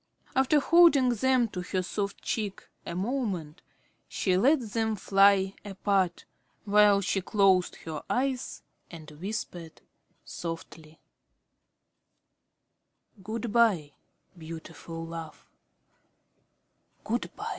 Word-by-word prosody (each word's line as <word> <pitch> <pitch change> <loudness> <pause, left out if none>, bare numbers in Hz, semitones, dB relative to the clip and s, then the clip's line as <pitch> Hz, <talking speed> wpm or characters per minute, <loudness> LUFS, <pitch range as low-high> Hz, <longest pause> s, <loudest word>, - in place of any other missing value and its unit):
After 265 +3 +4
holding 320 -4 +5
them 245 +1 +2
to 180 - -5
her 185 +1 -2
soft 200 +2 -4
cheek 210 -4 -3 0.2
a 170 - -4
moment, 190 - -3 0.5
she 185 -2 0
let 270 +11 +4
them 220 -1 0
fly 195 -1 +4
apart, 195 -3 -1 0.4
while 205 -1 +5
she 195 0 0
closed 190 -2 +2
her 160 -2 -5
eyes 260 0 -2 0.3
and 160 -3 -11
whispered 175 -1 -6 0.5
softly: 165 -1 -8 2.2
"Good 220 +2 -5
by, 200 -11 +3 0.4
beautiful 165 0 -8
love, 165 -1 -8 1.6
good - - -2
by." - - -5
195 Hz, 95 wpm, -28 LUFS, 170-225 Hz, 2.2 s, holding